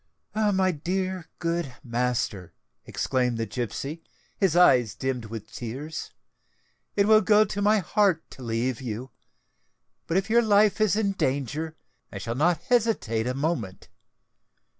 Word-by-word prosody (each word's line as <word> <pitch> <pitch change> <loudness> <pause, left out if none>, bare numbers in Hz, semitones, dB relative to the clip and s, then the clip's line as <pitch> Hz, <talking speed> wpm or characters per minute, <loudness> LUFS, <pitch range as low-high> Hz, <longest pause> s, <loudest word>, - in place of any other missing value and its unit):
"My 200 -3 +2
dear, 185 +2 -3
good 170 -6 -2
master," 120 - -2 0.3
exclaimed 125 -2 0
the 115 - -1
gipsy, 125 +8 -4 0.3
his 190 -5 +1
eyes 125 -11 +5
dimmed 130 -3 -3
with 110 -1 -8
tears, 135 +7 -6 0.9
"it 200 0 +3
will 215 0 +7
go 210 +1 +5
to 205 0 -4
my 210 +2 +4
heart 195 -3 +1
to - - -12
leave 120 +1 -2
you; 125 +1 -5 1.0
but 165 - +1
if 195 +1 0
your 235 +2 +4
life 210 -1 +3
is 215 -2 +3
in 210 -2 +1
danger, 150 - -2 0.4
I - - -6
shall 105 +4 -4
not 165 +5 +1
hesitate 210 - +1
a 125 - -1
moment. 135 - -3
155 Hz, 140 wpm, -26 LUFS, 120-195 Hz, 1.0 s, will